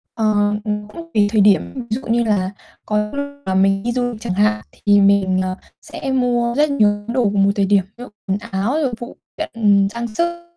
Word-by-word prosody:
Ờ, 210 -2 +2
cũng 210 0 -3 0.3
tùy 205 -1 +3
thời 215 - +3
điểm. 200 0 +3
Ví 255 - -5
dụ 235 +5 -2
như 235 +1 +2
là 200 -4 0 0.3
có 210 0 0
lúc 285 0 -2 0.2
là 190 - -1
mình 195 +1 +2
đi 240 - -1
du 245 0 -1
lịch 220 -1 -10
chẳng 210 -6 -3
hạn, 210 +3 +2
thì 205 -1 +3
mình, 195 -2 +3
ờ, 185 0 -3 0.3
sẽ 270 - -6
mua 240 -2 +1
rất 300 +1 +3
nhiều 220 -8 +3
những 205 +3 -4
đồ 245 -5 +2
vào 200 -1 +2
một 200 - +4
thời 200 -1 +2
điểm, 195 -1 +3
ví 245 - -8
dụ - - -9 0.2
quần 190 +1 0
áo 200 +6 -2
rồi 260 -5 -1
phụ 240 - -9 0.2
kiện, 210 -9 +2
trang 235 +2 -4
sức. 345 +9 -3
210 Hz, 225 wpm, -19 LUFS, 200-240 Hz, 0.3 s, một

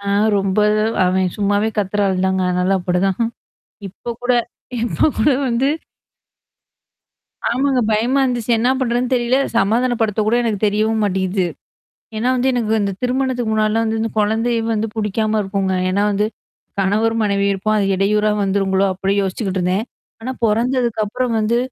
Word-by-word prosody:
ஆ, 200 - -10 0.3
ரொம்ப 195 0 0 0.5
அவன் 185 +1 +2
சும்மாவே 205 +1 +1
கத்துற 205 0 0
ஆள் 185 -1 0
தாங்க. 190 0 0
அதனால 180 +2 +1
அப்படிதான். 180 +1 0 0.7
இப்ப 235 +5 -7
கூட 250 +1 +2 0.5
இப்ப 240 +6 +1
கூட 295 - +4 0.2
வந்து 245 +3 +1 1.8
ஆமாங்க. 260 +2 +1
பயமா 235 +6 +2
இருந்துச்சு. 245 -2 -2
என்ன 240 +3 +2
பண்றதுன்னு 245 0 0
தெரியல. 240 +1 +1 0.2
சமாதானப்படுத்த 230 -1 +1
கூட 220 - +2
எனக்கு 220 -4 -1
தெரியவும் 215 +2 +1
மாட்டிகிது. 190 -1 0 0.7
ஏன்னா 230 +4 0
வந்து 255 +1 +1
எனக்கு 230 -3 -1
இந்த 200 -1 0
திருமணத்துக்கு 250 -2 0
முன்னாடிலாம் 215 +1 +1
வந்து 220 0 -1
இந்த 225 - -1
குழந்தையே 225 +3 +1
வந்து 220 0 -1
புடிக்காம 215 0 0
இருக்குங்க. 195 -1 -1 0.2
ஏன்னா 200 +2 +1
வந்து. 205 +1 +1 0.5
கணவர் 210 +4 +1
மனைவியும் 200 -1 +1
இருப்போம். 215 +3 0
அது 205 - +1
இடையூற 210 +2 +1 0.2
வந்துருங்களோ 195 0 +1
அப்டி 195 +1 -1
யோசிச்சுக்கிட்டு 190 0 -2
இருந்தேன். 185 +5 0 0.4
ஆனா 255 +3 -4
பொறந்ததுக்குப்புறம் 235 0 0
வந்து. 220 +2 +1
215 Hz, 140 wpm, -19 LUFS, 195-235 Hz, 1.8 s, கூட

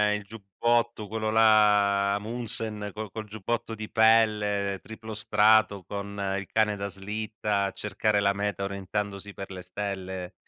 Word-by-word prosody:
il 105 - -5
giubbotto, 115 +2 -1
quello 110 +1 -2
là, 105 -2 +4
Amundsen 110 -1 -2
col 105 0 -6
col 110 +1 -6
giubbotto 110 +2 -3
di 110 -1 -7
pelle, 105 -3 +3
triplo 110 +3 -9
strato, 105 -1 +3
con 100 0 -4
il 100 - -8
cane 110 -1 +2
da 100 0 -4
slitta 105 +1 -2
a 100 - -2
cercare 105 +1 0
la 100 0 +3
meta 100 0 -2
orientandosi 100 +1 -4
per 95 - -7
le 95 -1 -7
stelle, 95 -1 -5
105 Hz, 145 wpm, -27 LUFS, 100-110 Hz, -, là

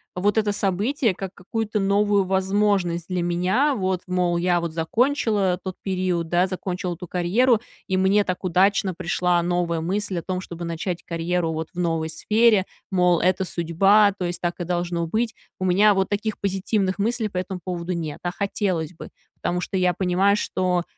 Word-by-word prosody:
вот 205 +4 +1
это 210 -1 +2
событие 210 +5 0
как 190 0 -6
какую-то 215 +3 -3
новую 200 0 +2
возможность 190 -2 +1
для 180 -1 -1
меня, 185 +12 +1
вот. 185 -4 -1
Мол, 180 -1 +1
я 175 0 +2
вот 170 -2 -4
закончила 205 - +1
тот 185 -1 -5
период, 185 -3 -1
да, 175 +2 +3
закончила 185 -1 -4
ту 180 - -8
карьеру, 215 +8 +2 0.3
и 190 - 0
мне 190 +2 +3
так 185 +1 -3
удачно 190 +1 +2
пришла 175 0 +1
новая 175 -1 0
мысль 195 +2 -2
о - - -9
том, 185 -1 -3
чтобы 170 -2 -7
начать 170 +1 -4
карьеру 170 0 -1
вот 160 0 -4
в 180 - -7
новой 165 -2 0
сфере, 215 +4 +3 0.3
мол: 180 -2 +3
"Это 185 +2 +2
судьба, 195 +5 +3
то 185 - -2
есть 175 0 -4
так 175 +1 -2
и 175 - -3
должно 175 -1 -1
быть". 225 +6 -1 0.2
У - - -3
меня 200 +3 +5
вот 195 -1 0
таких 210 +1 -2
позитивных 195 0 0
мыслей 225 +1 0
по 185 - -6
этому 185 0 -4
поводу 180 0 -3
нет, 160 -4 -4
а 175 - -1
хотелось 185 -4 -2
бы. 165 - -10 0.3
Потому 180 0 -2
что 190 - -3
я 180 -1 +2
понимаю, 190 +2 +2
что 180 -3 0
185 Hz, 180 wpm, -23 LUFS, 175-200 Hz, 0.3 s, меня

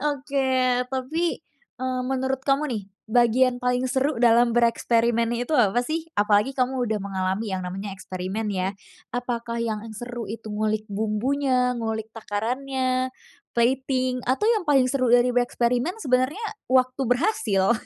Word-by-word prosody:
Oke, 275 -1 -1 0.4
tapi, 310 +7 -1 0.4
eee, 255 0 -1
menurut 265 0 -1
kamu 280 +2 +2
nih, 225 -5 -3 0.3
bagian 245 +2 +3
paling 250 +1 0
seru 265 -1 0
dalam 235 0 +5
bereksperimen 235 0 +2
itu, 290 +5 0
apa, 235 0 +3
sih? 320 +5 -4
Apalagi 210 +4 +2
kamu 255 -1 0
udah 220 -2 -1
mengalami 195 +2 -2
yang 185 - -5
namanya 190 +3 -5
eksperimen 190 +3 -4
ya. 190 +1 -2 0.4
Apakah 235 -1 -3
yang 225 -2 -2 0.2
seru 240 -2 -6
itu 220 0 -6
ngulik 215 0 -1
bumbunya, 250 +5 +1
ngulik 220 -2 -4
takarannya, 255 +4 -1 0.5
plating, 255 +1 +1
atau 265 +11 +1
yang 430 -7 +2
paling 270 -3 +5
seru 255 -2 +1
dari 245 +1 +5
bereksperimen 245 - +1
sebenarnya 260 - +1 0.2
waktu 255 0 +2
berhasil? 245 - +2
245 Hz, 135 wpm, -24 LUFS, 220-260 Hz, 0.5 s, dalam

